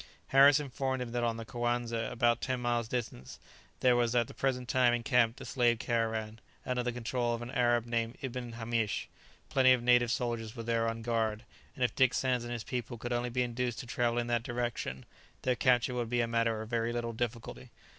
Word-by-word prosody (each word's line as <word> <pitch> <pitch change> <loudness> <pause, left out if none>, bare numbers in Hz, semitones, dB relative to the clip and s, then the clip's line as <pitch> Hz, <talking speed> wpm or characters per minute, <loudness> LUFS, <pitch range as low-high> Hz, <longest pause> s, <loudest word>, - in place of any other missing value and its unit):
Harris 140 +2 +7
informed 135 -2 -2
him 125 -2 -4
that 120 0 -1
on 115 -1 0
the 115 - -6
Coanza, 120 -1 -2
about 120 0 +2
ten 130 -1 -1
miles 120 -1 0
distant, 110 - -5 0.4
there 125 -1 +5
was 120 0 +1
at 120 -2 +3
the - - -11
present 125 -2 -1
time 125 -1 +3
encamped 115 0 +2
a - - -8
slave 120 -2 +2
caravan, 110 -1 -2 0.3
under 125 -1 0
the 125 0 -1
control 120 0 -1
of 115 - -6
an 120 - -7
Arab 120 -2 +2
named 115 0 -2
Ibn 125 -2 -5
Hamish; 115 -2 -1 0.4
plenty 130 -4 +5
of 125 -2 0
native 120 -1 +4
soldiers 115 -2 -2
were 115 - -6
there 115 0 +1
on 115 0 -5
guard, 110 -2 -1 0.3
and 130 - -2
if 125 - +1
Dick 130 -2 +3
Sands 125 -2 +1
and 120 - -6
his 120 -2 -4
people 120 -1 -4
could 120 +2 -4
only 120 +1 -1
be 125 +1 0
induced 120 0 -2
to - - -10
travel 120 0 0
in 120 - +1
that 120 -1 0
direction, 120 - -3 0.4
their 130 -1 +2
capture 125 -1 +2
would 120 -2 -2
be 120 0 +1
a 115 - 0
matter 115 -1 0
of 110 - -11
very 115 0 0
little 120 -1 -3
difficulty. 120 +2 -5
120 Hz, 215 wpm, -31 LUFS, 115-125 Hz, 0.4 s, Harris